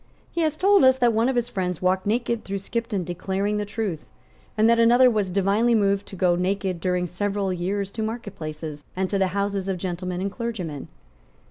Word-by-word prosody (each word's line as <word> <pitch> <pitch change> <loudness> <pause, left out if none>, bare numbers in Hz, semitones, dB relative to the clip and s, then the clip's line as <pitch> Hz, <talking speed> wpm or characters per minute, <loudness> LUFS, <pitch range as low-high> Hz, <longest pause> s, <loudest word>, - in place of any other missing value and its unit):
He 340 - -1
has 310 -1 0
told 395 +1 +5
us 260 0 +6
that 240 -2 +3
one 225 +3 +2
of 265 - -1
his 240 -1 +1
friends 180 -7 -3
walked 185 +1 +1
naked 235 +1 0
through 195 0 -3
Skipton 210 0 -3
declaring 190 +4 -2
the 210 - -1
truth. 205 -7 -4 0.5
and 215 +1 +5
that 230 0 +4
another 245 +2 +6
was 210 -4 0
divinely 200 +5 +2
moved 200 -2 +1
to - - -9
go 180 -1 +2
naked 185 0 -1
during 180 0 0
several 195 +2 -2
years 195 +3 -2
to 220 - -5
marketplaces, 160 -9 -5
and 190 0 -1
to 200 - +1
the 190 - +3
houses 200 -1 -1
of 190 -1 -1
gentlemen 180 0 -4
and 195 +1 -2
clergymen. 190 - -5
200 Hz, 200 wpm, -24 LUFS, 185-230 Hz, 0.5 s, us